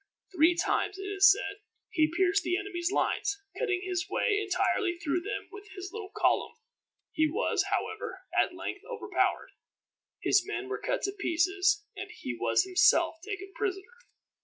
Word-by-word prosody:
Three 330 +2 +5
times, 390 +3 0
it 390 - -6
is 395 0 +6
said, 400 0 -2 0.3
he 315 -3 +2
pierced 380 +1 +3
the 355 0 0
enemy's 365 -3 -2
lines, 400 0 0 0.2
cutting 375 -6 0
his 365 -1 -2
way 415 -1 +1
entirely 390 -2 +1
through 345 +1 -1
them 415 - -4
with 420 0 -11
his 375 -1 -7
little 430 -3 -6
column. - - +1 0.6
He 315 0 +2
was, 415 +11 +1
however, 440 -1 -3
at - - +2
length - - -5
overpowered. 465 - -1 0.7
His - - +3
men 400 -1 -4
were 415 - -3
cut - - -1
to 395 - 0
pieces, 385 +1 +1
and 385 +2 -6
he 430 - -6
was - - +2
himself 370 -3 +4
taken 390 -1 -6
prisoner. 405 +2 -3
390 Hz, 160 wpm, -29 LUFS, 360-410 Hz, 0.7 s, is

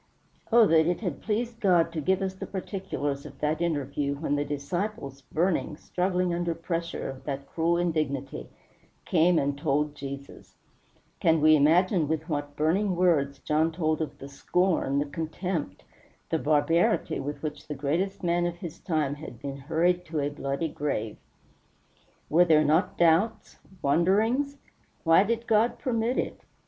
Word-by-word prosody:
Oh 230 0 +7
that 160 -3 +4
it 175 +3 0
had 185 -5 -3
pleased 230 +2 -2
God 175 -5 +3
to 160 - -2
give 190 +5 +1
us 190 -1 -2
the 190 - -7
particulars 185 -8 -4
of - - -12
that 155 +2 0
interview 145 -3 -1
when 145 0 -1
the 145 - 0
disciples, 145 0 -4
burning, 160 0 -1
struggling 180 0 -1
under 170 -1 -1
pressure 165 0 -3
of 135 -1 -8
that 140 -1 -4
cruel 165 +3 0
indignity, 145 - -2 0.6
came 175 0 +3
and 140 -1 +1
told 145 +1 0
Jesus! 140 -1 -9 0.6
Can 165 -1 +3
we 155 +1 +6
imagine 165 +3 +3
with 160 +1 -2
what 145 -3 -3
burning 185 +6 +1
words 160 -6 +2
John 155 +2 +1
told 160 -1 -1
of 155 -3 -4
the 135 - -9
scorn, 140 0 0
the 145 - +1
contempt, 160 - -4 0.5
the 160 - +1
barbarity 155 +3 +2
with 145 +3 -5
which 150 -2 -5
the 150 - -4
greatest 165 +9 -1
man 175 0 +1
of 175 - -4
his 170 -2 -8
time 155 -6 -1
had 145 -5 -9
been 140 -1 -5
hurried 165 +5 +1
to 160 -2 -3
a 145 0 0
bloody 145 +2 -3
grave? 135 -8 -3 1.1
Were 175 +3 +5
there 155 -2 +4
not 160 +6 +2
doubts 170 +6 +2 0.2
wonderings? 215 - +2 0.5
Why 165 +2 +6
did 230 +2 -1
God 225 +1 +2
permit 235 0 -1
it? - - -2
160 Hz, 155 wpm, -27 LUFS, 145-180 Hz, 1.1 s, Oh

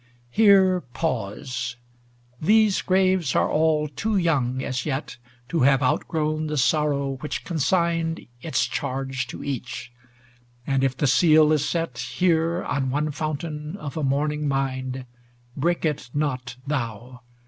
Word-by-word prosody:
LI 125 - -32 0.2
Here 190 - +5
pause: 125 -3 -3 0.7
these 215 +3 +4
graves 185 -5 +2
are - - +3
all 155 -1 +2
too 205 +9 -1
young 135 -7 +1
as 130 -1 -2
yet 135 -2 -3 0.3
To 170 - 0
have 135 +1 +4
outgrown 155 +4 0
the 150 0 -2
sorrow 140 -1 +1
which 150 +3 -5
con 165 -3 -3
signed 165 0 +1 0.2
Its 160 - 0
charge 135 -1 -3
to - - -8
each; 125 -2 -5 0.7
and 135 -1 +1
if 130 -2 0
the 145 - +1
seal 155 +2 +5
is 150 -1 +1
set, 165 -8 -2
Here, 165 +7 +1
on 135 -1 -1
one 150 +3 0
fountain 155 +2 -4
of 150 -7 -7
a 160 - -2
mourning 150 +2 0
mind, 130 -1 -2 0.5
Break 170 +4 0
it 150 -5 -2
not 130 -5 -2
thou 125 -3 -4
150 Hz, 140 wpm, -24 LUFS, 130-165 Hz, 0.7 s, Here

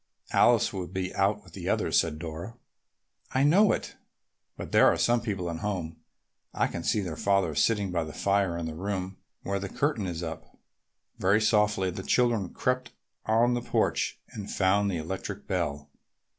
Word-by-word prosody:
"Alice - - +4
will 95 -2 -4
be 95 0 -4
out 100 +2 +1
with 90 -3 -18
the - - -5
others," - - +2
said 80 -2 -1
Dora. 85 +8 -7 0.8
"I 130 - +4
know 190 +9 +5
it, - - -3 0.6
but - - -7
there - - +6
are - - +3
some 120 0 +2
people 100 -6 -3
at 85 -1 -3
home. 85 -4 -3 0.6
I - - +2
can - - -4
see 105 - +1
her 90 -5 -4
father 100 -2 +1
sitting 100 +5 +1
by 85 -2 0
the 80 - -7
fire 100 -1 +1
in 85 - -3
the 80 - -4
room 95 +2 -4 0.3
where 100 0 -1
the 100 0 -5
curtain 140 -7 -1
is 85 -1 -4
up." 80 -1 -7 0.6
Very 100 +3 +4
softly 105 -3 +2
the 95 - -6
children 115 -3 +1
crept 125 0 -2 0.3
on 115 +3 +3
the 120 - -1
porch - - 0
and 100 -2 -7
found 100 +1 +2
the 90 - -1
electric 95 +5 -5
bell. 75 -7 -2
95 Hz, 180 wpm, -28 LUFS, 85-105 Hz, 0.8 s, there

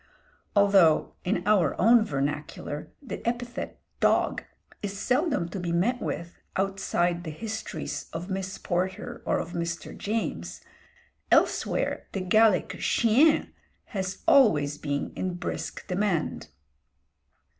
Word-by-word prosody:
Although 195 -6 +5
in 180 -1 0
our 190 -8 +3
own 230 0 +6
vernacular 145 -2 -3
the 255 - -6
epithet 240 +1 -3 0.2
"dog!" - - +2 0.4
is 200 -1 -4
seldom 270 - +1
to 190 - -5
be 175 -1 -2
met 225 +9 +1
with 170 0 -4 0.2
outside 185 -3 0
the 165 - -5
histories 220 +7 -5
of 165 +2 -5
Miss 190 0 -3
Porter 185 +1 -2
or - - +2
of 170 - -4
Mr. 170 0 -4
James, 85 - -3 0.7
elsewhere - - +2
the 195 - -2
Gallic 215 +1 +3
"chien!" 260 +8 +3 0.4
has 190 -2 -3
always 155 - +5
been 145 -1 -2
in 185 -1 -2
brisk 175 - -5
demand. 185 -3 -1
190 Hz, 115 wpm, -27 LUFS, 170-220 Hz, 0.7 s, own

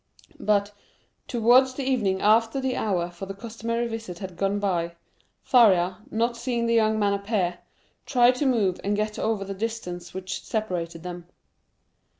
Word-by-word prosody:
But, 205 -1 +1 0.6
towards 250 +2 +4
the 275 - -3
evening 215 -8 0
after 225 +4 +4
the 265 -1 -1
hour 180 -5 -1
for 190 +2 -8
the 195 - -6
customary 230 +2 -3
visit 225 -6 -6
had 185 -1 -7
gone 195 +2 0
by, 175 -4 -1 0.5
Faria, 185 -7 +4
not 235 +2 0
seeing 235 0 -1
the 230 - +1
young 220 -1 +3
man 205 -1 +2
appear, 200 -3 -1 0.5
tried 245 -1 +5
to 285 - +1
move 205 -8 +1
and 205 +1 0
get 215 +1 -2
over 215 -3 -1
the 195 - -5
distance 190 -5 -5
which 190 +1 -5
separated 175 -6 -3
them. 175 -1 -7
210 Hz, 155 wpm, -25 LUFS, 190-230 Hz, 0.6 s, tried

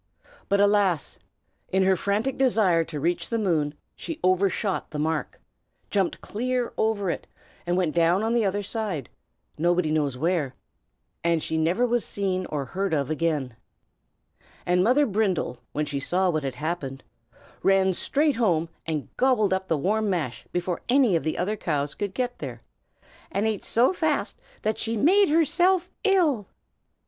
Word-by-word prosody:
But, 200 - +3
alas! 200 -6 +2 0.5
in 190 0 +2
her 190 0 +4
frantic 205 +8 -1
desire 215 -10 +3
to 150 -2 -6
reach 170 +4 -1
the 230 - 0
moon 160 -8 0 0.2
she 325 -2 -6
overshot 185 +1 +1
the 150 - -6
mark; 155 +1 -2 0.5
jumped 195 -3 0
clear 250 +2 -2
over 205 -4 0
it, - - -6 0.4
and 175 +1 +1
went 175 -4 +1
down 170 +4 +3
on 225 +1 +1
the 235 -1 +3
other 205 +1 0
side, 200 - -3 0.5
nobody 175 -1 +2
knows 145 -4 0
where, 155 -3 0 0.7
and 170 -2 +1
she 160 - -2
never 170 +9 +2
was 240 -1 +1
seen 185 -2 -2
or 145 -2 -3
heard 190 +2 -1
of 140 -1 -1
again. 150 -6 -1 1.1
And 180 +1 +3
Mother 260 +7 +4
Brindle, 195 - 0
when 150 +1 -1
she 140 -1 -3
saw 180 +6 +1
what 155 -2 -1
had 135 -2 -4
happened, 150 -4 -4 0.6
ran 195 -1 +3
straight 290 - +1
home 170 -8 +1 0.2
and 155 -3 -2
gobbled 245 -7 +3
up 190 0 -2
the 160 - +1
warm 210 +8 0
mash 160 -10 -3
before 175 0 -2
any 250 -7 +4
of 165 - +2
the 155 - -2
other 200 +5 0
cows 145 -7 -2
could 200 -2 -4
get 250 -1 -2
there, 120 -5 -7 0.7
and 200 +3 0
ate 220 -3 -1
so 245 +10 +3
fast 315 -4 -1 0.2
that 215 - 0
she 225 0 -1
made 375 - +4
herself 350 +4 +3
ill. 335 - +2
190 Hz, 160 wpm, -25 LUFS, 160-220 Hz, 1.1 s, her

